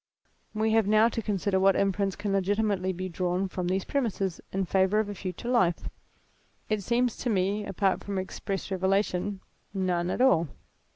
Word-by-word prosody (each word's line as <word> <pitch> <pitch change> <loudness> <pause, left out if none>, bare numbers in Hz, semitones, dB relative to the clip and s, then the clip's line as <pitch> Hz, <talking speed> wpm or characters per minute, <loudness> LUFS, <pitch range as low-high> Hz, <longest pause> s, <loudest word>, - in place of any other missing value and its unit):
"We 220 +1 +1
have 220 -2 +3
now 215 +2 +5
to 230 - -3
consider 200 -2 0
what 195 0 +4
inference 195 0 +1
can 205 -1 -2
legitimately 195 -1 +1
be 185 +1 -4
drawn 180 +1 -1
from 180 -1 -3
these 190 +1 0
premises, 200 - -1
in 190 0 -1
favour 190 +3 +2
of 215 -1 -1
a - - -3
future 185 +3 -6
life. 210 -9 +1 0.8
It 215 -1 0
seems 240 +3 +1
to 245 - -2
me, 200 0 +1
apart 195 0 0
from 200 -1 -4
express 195 +1 -4
revelation, 190 0 0 0.3
none 180 -2 0
at - - -2
all. 250 -11 +4
195 Hz, 170 wpm, -28 LUFS, 185-215 Hz, 0.8 s, now